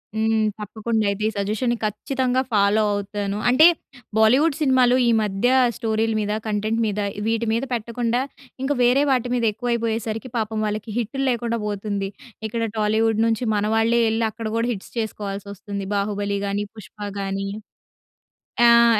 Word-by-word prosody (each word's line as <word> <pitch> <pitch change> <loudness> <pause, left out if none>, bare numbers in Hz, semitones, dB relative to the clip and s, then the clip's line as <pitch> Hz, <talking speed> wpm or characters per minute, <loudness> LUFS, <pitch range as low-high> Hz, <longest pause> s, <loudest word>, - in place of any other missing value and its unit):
హ్మ్. 220 0 +2 0.2
తప్పకుండా 220 +2 -2
అయితే 200 +1 -2
ఈ - - +2
సజెషన్‌ని 215 +5 0
ఖచ్చితంగా 255 +4 0
ఫాలో 205 +1 +4
అవుతాను. 205 0 -3
అంటే, 260 +7 +7 0.5
బాలీవుడ్ 260 +8 +4
సినిమాలు 260 -3 +4
ఈ - - +4
మధ్య 205 +2 0 0.3
స్టోరీలు 225 0 0
మీద, 210 0 -2 0.2
కంటెంట్ 215 +2 0
మీద 210 0 -2 0.3
వీటి 230 +1 0
మీద 230 +3 0
పెట్టకుండా, 235 +1 -1 0.4
ఇంకా 285 +2 +1
వేరే 250 +4 +4
వాటి 250 -2 +1
మీద 240 - 0
ఎక్కువైపోయేసరికి 230 0 -2
పాపం 220 -1 -1
వాళ్ళకి 215 +1 -3
హిట్‌లు 240 +4 -2
లేకుండా 235 -1 -1
పోతుంది. 200 -1 -3 0.4
ఇక్కడ 230 +2 -3 0.2
టాలీవుడ్ 220 +1 +2
నుంచి 225 +2 0
మన 205 0 +1
వాళ్ళే 230 +1 +3
ఎళ్లి 225 +1 +1
అక్కడ 220 +1 -5
కూడా 230 +1 +1
హిట్‌స్ 195 - -10
చేసుకోవాల్సి 205 -2 -4
వస్తుంది. 200 0 -6
'బాహుబలి' 200 0 -1
గాని, 200 +1 -1
'పుష్ప' 210 -1 -8
గాని, 195 0 -2 1.2
ఆహ్, 235 0 +6
220 Hz, 145 wpm, -23 LUFS, 205-235 Hz, 1.2 s, అంటే